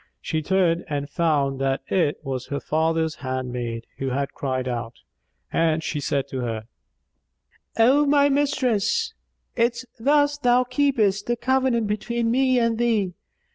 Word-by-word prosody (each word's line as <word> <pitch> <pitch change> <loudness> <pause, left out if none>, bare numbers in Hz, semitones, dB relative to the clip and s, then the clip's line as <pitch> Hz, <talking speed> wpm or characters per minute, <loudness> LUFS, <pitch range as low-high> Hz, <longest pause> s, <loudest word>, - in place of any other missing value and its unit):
She 160 -1 -2
turned 175 0 +1
and 145 -1 -2
found 140 -3 0
that 135 0 0
it 165 -6 +1
was 130 -2 -4
her 140 - -3
father's 160 0 0
handmaid, 125 -3 -4
who 135 - -1
had 140 +2 -2
cried 130 -2 -2
out; 120 -1 -4 0.6
and 160 -1 +2
she 150 - -2
said 140 -1 -1
to 130 - -4
her, 115 -3 -3 1.1
"O 265 +6 +5
my 285 0 +5
mistress, 285 - +1 0.4
is't 235 +1 0
thus 290 +3 +3
thou 245 -1 +4
keepest 250 -6 +1
the 240 - +1
covenant 255 -1 +1
between 230 +3 -1
me 260 +1 +3
and 230 -1 +1
thee? 220 -6 +1
190 Hz, 140 wpm, -24 LUFS, -, 1.1 s, O